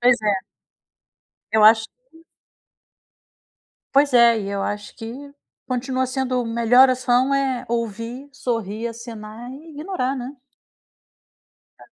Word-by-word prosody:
Pois 245 0 +5
é. 200 -3 0 1.1
Eu 215 0 +4
acho 220 +1 +7
que - - -24 1.7
Pois 280 0 +4
é, 235 -1 +6
e 200 - -5
eu 200 0 -2
acho 205 0 -4
que 255 +5 -8 0.3
continua 255 +1 -1
sendo 255 -1 -1
melhor 235 +3 +5
ação 255 +1 +2
é 270 -2 0
ouvir, 230 +3 -4
sorrir, 230 -4 -3
acenar 230 0 -9
e 310 +5 -12
ignorar, 295 -4 -3
né. 255 +2 -6 1.5
É. - - -14
245 Hz, 115 wpm, -22 LUFS, 225-265 Hz, 1.7 s, acho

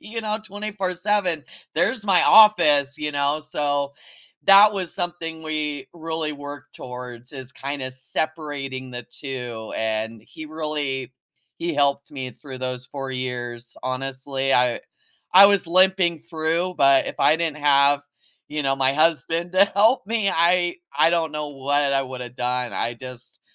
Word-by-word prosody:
you 225 +1 -6
know, 215 0 -3
24/7. 195 -4 -2 0.3
There's 210 +7 0
my 190 -3 +4
office, 150 -10 +6
you 150 0 -3
know, 145 +1 +1
so 145 -2 -1 0.5
that 200 +2 +7
was 185 -4 -3
something 170 -3 -4
we 150 -2 -4
really 160 -2 -4
worked 145 -2 -10
towards 125 0 -9
is 130 0 -6
kinda 135 -1 -5
separating 135 0 -4
the 120 -1 -6
2, 125 -4 -7
and 110 0 -1
he 155 - -11
really 150 -5 -4 0.4
he 170 0 -4
helped 140 -1 +1
me 130 -3 -6
through 130 -1 -11
those 130 -1 -4
4 135 0 -7
years. 120 -2 -5
Honestly, 135 +1 -3
I 125 -1 +3 0.5
I 195 +2 +9
was 200 -3 +4
limping 185 -1 +3
through, 165 +2 0
but 140 -1 +6
if - - -3
I 155 - +5
didn't 160 -2 -2
have, 145 -1 +4 0.5
you 150 0 -4
know, 135 -1 0
my 135 0 +2
husband 165 +3 0
to 190 +1 +5
help 215 +5 +2
me, 220 -2 -1
I 175 +1 +2 0.2
I - - +5
don't 165 -2 -1
know 150 -1 -4
what 140 +1 +3
I 135 - +3
woulda 130 -2 -7
done. 125 0 -2
I 120 - -1
just 125 -1 -9
145 Hz, 150 wpm, -22 LUFS, 130-170 Hz, 0.5 s, I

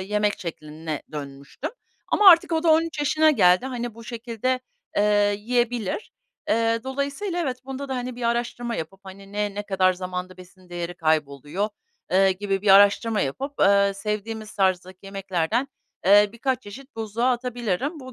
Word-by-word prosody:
yemek 210 +2 0
şekline 155 -2 -6
dönmüştüm. 140 - -7 0.4
Ama 400 -3 +8
artık 335 0 +5
o 320 0 +1
da 335 - +2
13 320 0 +2
yaşına 310 +2 +4
geldi. 185 -2 +4
Hani, 240 -3 -4
bu 230 0 -12
şekilde, 240 +2 -2 0.4
eee, 205 0 +3
yiyebilir. 240 - -1 0.4
Eee, 230 +1 +2
dolayısıyla 280 +8 -3
evet, 255 -4 -3
bunda 270 +1 -6
da, 265 - -2
hani, 250 0 -4
bir 245 - -8
araştırma 235 0 -1
yapıp, 165 +4 -6
hani, 195 +1 -12
ne, 205 -1 -2
ne 205 - -3
kadar 190 -2 +2
zamanda 185 0 -5
besin 185 0 -16
değeri 175 0 -5
kayboluyor, 155 +4 -1 0.4
eee, 190 0 +4
gibi 195 0 -2
bir 210 - 0
araştırma 205 +2 +5
yapıp, 270 - -3
eee, 200 0 +5
sevdiğimiz 215 +1 -4
tarzdaki 185 -1 0
yemeklerden, 195 +5 -1 0.4
eee, 205 +1 +7
birkaç 255 +1 -1
çeşit 260 +6 -12
buzluğa 225 +3 0
atabilirim. 245 - -2
Bu 260 -1 -10
210 Hz, 155 wpm, -24 LUFS, 185-250 Hz, 0.4 s, Ama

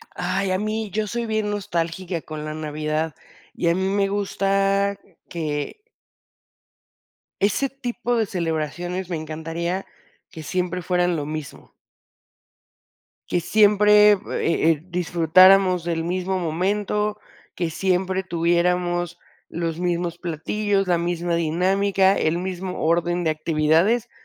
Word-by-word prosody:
Ay, 195 -1 -1
a 185 - +2
mí 215 +1 -2
yo 215 +1 -1
soy 235 +3 -3
bien 220 -2 -1
nostálgica 175 -3 -3
con 155 -1 -7
la 155 0 -4
Navidad, 155 +1 -3 0.4
y 170 - 0
a 170 - +2
mí 190 - -1
me 195 0 +1
gusta 195 0 +1 0.3
que 155 - -3 1.6
ese 210 +7 +2
tipo 245 -2 -3
de 220 -2 +1
celebraciones 175 +1 -3
me 175 - -2
encantaría 165 +4 -4 0.4
que 160 - -9
siempre 180 +2 -2
fueran 180 0 +1
lo 150 -3 -3
mismo. 155 -2 -7 1.6
Que - - +1
siempre, 210 +2 +5
eh 200 - -1 0.5
eh, 150 -3 -2
disfrutáramos 180 +1 +5
del 165 -1 -2
mismo 185 +2 -1
momento, 205 +5 -1 0.4
que 170 -2 -1
siempre 185 +2 0
tuviéramos 175 0 0 0.3
los 165 -1 -3
mismos 175 -1 -1
platillos, 195 +4 -1
la 175 - +3
misma 170 0 -1
dinámica, 190 +4 +2
el 160 +2 +1
mismo 185 0 -4
orden 175 +2 +1
de 160 - +1
actividades, 160 +9 +2
180 Hz, 120 wpm, -23 LUFS, 165-195 Hz, 1.6 s, siempre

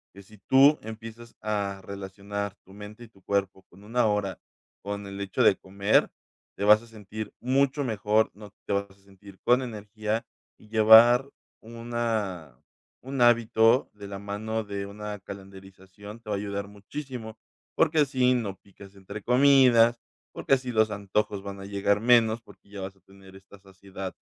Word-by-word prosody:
que 100 - -12
si 105 +2 -18
tú 140 +7 +5
empiezas 115 +1 -10
a 100 -2 -2
relacionar 100 +1 -6
tu 95 - -17
mente 105 +3 -11
y - - -12
tu 95 -3 -24
cuerpo 100 -1 -2
con 100 - -18
una 115 +2 +1
hora, 105 -3 -1 0.4
con 100 +1 -5
el 100 0 -7
hecho 95 -2 -1
de - - +6
comer, 100 +2 +1 0.5
te - - -3
vas 105 +1 +6
a 115 - -16
sentir 110 -1 -8
mucho 135 +3 +1
mejor, 110 -2 +1
¿no?, 105 0 -12 0.2
te - - -2
vas 100 0 -1
a - - -18
sentir 100 0 -17
con 125 +2 +4
energía. 110 -1 -4 0.3
Y 105 - -19
llevar 115 +4 +7 0.3
una 110 - -4 0.5
un 135 0 -4
hábito 115 0 +4
de 100 -1 -10
la 100 0 -6
mano 110 +2 -4
de 100 -1 -5
una 105 0 -7
calendarización 95 +1 -12
te 110 - -12
va - - +1
a - - -3
ayudar 100 0 -4
muchísimo, 110 +2 -8 0.4
porque 160 - +2
así 130 -3 +3
no 110 -6 -2
picas 100 0 -16
entre 100 +2 -9
comidas, 125 -2 +5 0.3
porque - - 0
así 130 -1 -5
los 110 -1 +3
antojos 100 0 -2
van 100 0 -7
a 95 - -8
llegar 100 +1 0
menos, 115 -1 +4
porque 100 -3 -20
ya 100 -1 -8
vas 95 +1 -7
a 95 - -29
tener 95 +1 -17
esta 95 +1 -16
saciedad, 95 0 -9
105 Hz, 170 wpm, -26 LUFS, 100-115 Hz, 0.5 s, llevar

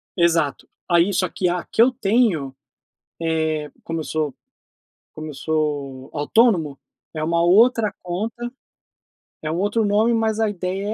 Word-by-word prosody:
Exato. 170 -5 +1 0.2
Aí 175 +3 +4
só 185 0 +1
que 185 - -1
a 175 0 -2
que 225 - +1
eu 255 +2 +6
tenho, 195 - +1 0.7
eh, 160 -2 -1
como 165 0 -4
eu 155 - -5
sou 155 -4 -2 0.8
como 155 0 -7
eu - - -7
sou 145 -3 -2
autônomo, 160 - +2 0.3
é 155 - -4
uma 170 +1 +1
outra 220 +4 +4
conta, 220 +7 -4 0.9
é 155 0 -3
um 165 - -2
outro 205 +4 +1
nome. 215 +3 +3
Mas 225 -1 0
a 220 -1 +2
ideia 190 +1 -3
175 Hz, 150 wpm, -22 LUFS, 155-215 Hz, 0.9 s, eu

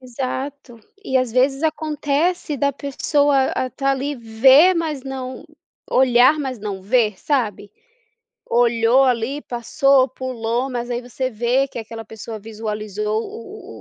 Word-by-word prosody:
Exato. 260 0 -6 0.3
E, 265 - 0
às 255 -3 0
vezes, 270 +4 +2
acontece 310 +1 -1
da 280 +1 +1
pessoa, 280 0 +1
a 255 - -2
tá 275 +3 -1
ali, 275 +2 -1
ver, 265 +9 +5
mas 315 -5 -2
não 260 -1 -6 0.5
olhar, 255 +3 +5
mas 265 -4 -4
não 200 -2 -5
ver, 215 -1 +2
sabe, 220 -8 -2 0.8
olhou 235 +2 +3
ali, 255 +3 0
passou, 260 +2 +2
pulou, 250 -1 -3
mas 240 -1 -4
aí 240 0 -2
você 255 +1 -4
vê 245 +4 +1
que 250 - -7
aquela 225 0 -8
pessoa 220 0 -8
visualizou 215 0 -3
o 400 - -10
255 Hz, 135 wpm, -20 LUFS, 230-275 Hz, 0.8 s, ver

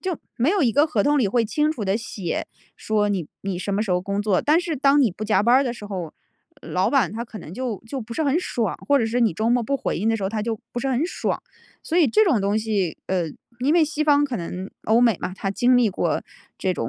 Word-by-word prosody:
就 370 -4 -2 0.2
没 255 +6 +2
有 385 -4 +2
一 235 -4 +3
个 290 +3 +4
合 225 -10 +1
同 290 0 +3
里 215 -6 +2
会 235 +2 +2
清 300 +8 +1
楚 235 -9 -4
地 195 +2 +1
写， 200 -7 -4 0.3
说， 210 -1 0
你 185 -6 -2
你 195 -2 -3
什 200 +2 -3
么 210 - +1
时 205 - -4
候 180 - +2
工 200 +2 -2
作， 205 -4 +2
但 310 +4 +4
是 335 -4 -3
当 280 +2 +4
你 230 - +3
不 210 +5 -6
加 205 -2 +2
班 240 +3 +5
儿 275 - +3
的 240 - -1
时 210 - -10
候， 180 -6 -5 0.5
老 - - 0
板 255 -9 +2
他 230 +2 -4
可 220 -2 -10
能， 155 - -10
就 240 -2 -4
就 265 +3 -4
不 230 0 -8
是 315 - 0
很 285 +4 +2
爽， 230 - -2
或 285 -1 +5
者 230 - +1
是 240 +2 0
你 220 -8 +2
周 220 +4 0
末 245 0 +3
不 275 +5 0
回 - - -2
应 215 +4 0
的 225 - +2
时 200 - -6
候， 190 - 0
他 215 0 -3
就 225 -1 -2
不 240 - -3
是 270 - -1
很 265 +4 +1
爽。 - - -3 0.4
所 345 +2 0
以 320 - +5
这 435 - +4
种 260 - +2
东 200 +2 +1
西 205 -6 -1
呃， 185 -2 +1 0.4
因 290 +6 +2
为 330 -2 +5
西 305 0 -2
方 290 -1 +4
可 260 -4 -3
能 180 +3 -6
欧 225 +2 +4
美 230 -6 +4
嘛， 185 - -3
它 195 - -3
经 245 +5 +3
历 235 -4 +3
过 - - -1 0.4
这 185 -1 0
种 115 -9 -3
225 Hz, 300 characters per minute, -23 LUFS, 200-275 Hz, 0.5 s, 班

